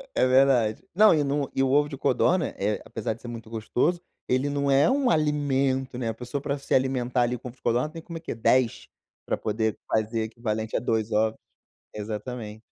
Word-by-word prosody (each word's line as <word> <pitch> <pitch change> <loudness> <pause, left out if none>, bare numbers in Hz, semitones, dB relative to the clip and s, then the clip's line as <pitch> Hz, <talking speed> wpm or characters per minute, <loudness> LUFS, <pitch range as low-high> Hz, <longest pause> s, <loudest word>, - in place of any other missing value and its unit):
É - - +4
verdade. 130 -4 +3
Não, 215 +4 +6
e 155 - +2
em 140 -1 -1
um 145 0 +1
o 135 -1 0
ovo 145 +1 +4
de 145 -2 -7
codorna, 165 +8 +2 0.3
apesar 110 -1 -3
de 115 - -16
ser - - -9
muito 115 -2 -8
gostoso, 120 +10 0 0.3
ele 130 +3 +1
não 140 0 0
é 135 - +5
um 270 -1 +2
alimento, 140 - +1
né. 120 -2 -2
A - - -2
pessoa 125 +4 -5
pra 140 0 -2
se 140 - -4
alimentar 130 -1 +1
ali 120 +1 +1
com 125 - -9
ovo 120 - -10
de - - -33
codorna 120 +5 +1
tem 165 +1 -9
como 170 0 -8
o - - -10
quê? 160 - -5
10 115 +1 +2 0.4
pra - - -1
poder 110 0 -1
fazer 110 +1 0
equivalente 110 -1 -3
a - - +2
2 110 -1 -1
ovos. 110 +1 +1 0.6
Exatamente. 105 +1 -6
125 Hz, 205 wpm, -26 LUFS, 115-140 Hz, 0.6 s, Não